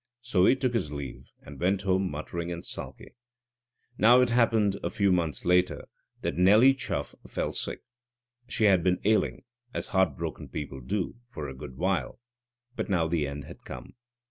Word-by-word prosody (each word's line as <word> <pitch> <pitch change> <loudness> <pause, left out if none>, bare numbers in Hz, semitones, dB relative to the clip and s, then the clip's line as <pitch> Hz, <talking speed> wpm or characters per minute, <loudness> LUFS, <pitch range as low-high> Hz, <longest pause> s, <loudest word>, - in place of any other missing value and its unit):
So 105 -7 +3
he - - +6
took 130 -2 -1
his 95 -11 -1
leave 70 -4 -7 0.2
and 70 - -11
went 95 +3 +1
home 95 -1 +1
muttering 85 +3 -4
and 85 0 -6
sulky. - - -7 0.9
Now 120 +3 +7
it 125 -1 +2
happened 110 -4 +3
a - - 0
few 100 -2 +2
months 85 -7 0
later 90 +1 +2 0.4
that - - -2
Nelly 105 +9 +7
Chuff 135 - -4
fell - - -2
sick. - - -4 0.6
She 115 - -1
had 95 -5 +5
been 90 0 +2
ailing, 110 +1 +2 0.3
as - - -4
heartbroken 95 -8 -1
people 70 -3 -6
do, 95 - -2
for 80 -12 -6
a 65 - -6
good 65 -2 -9
while. 95 +3 -1 0.6
But - - -3
now 85 -4 +2
the 80 -3 0
end 70 +1 -6
had - - -12
come. 60 -1 -9
90 Hz, 170 wpm, -28 LUFS, 75-105 Hz, 0.9 s, Now